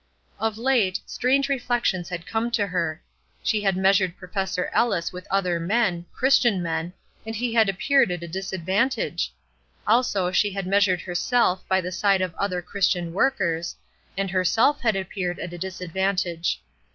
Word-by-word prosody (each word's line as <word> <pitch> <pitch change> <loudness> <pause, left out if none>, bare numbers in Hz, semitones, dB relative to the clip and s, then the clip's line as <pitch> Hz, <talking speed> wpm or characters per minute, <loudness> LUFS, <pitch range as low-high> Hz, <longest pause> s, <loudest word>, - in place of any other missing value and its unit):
Of 220 0 -1
late, 230 -6 +2
strange 270 +2 +1
reflections 240 -9 0
had 175 -2 -5
come 225 +1 -1
to 205 - +1
her. 170 -4 -2 0.4
She 220 -5 +1
had 195 -2 +1
measured 190 -1 +3
Professor 190 0 -3
Ellis 185 -8 +1
with 180 0 -9
other 180 -3 +1
men, 180 -2 0
Christian 240 -8 +3
men, 165 +1 -2 0.3
and 225 0 -5
he 235 +1 -2
had 225 -3 +4
appeared 270 +6 +3
at 175 -1 -3
a - - -5
disadvantage. 190 +7 -1 0.5
Also 210 -5 +2
she 205 +1 +2
had 195 -1 -3
measured 190 -2 +3
herself 185 +1 +1
by 190 0 +2
the 180 0 -5
side 195 +1 +2
of 185 -2 -1
other 180 -1 -2
Christian 180 -2 0
workers, 170 -8 0 0.4
and 195 -1 -1
herself 190 +9 +2
had 220 -4 +2
appeared 190 -2 -3
at 175 - -6
a - - -6
disadvantage. 180 - -2
190 Hz, 155 wpm, -24 LUFS, 180-220 Hz, 0.5 s, had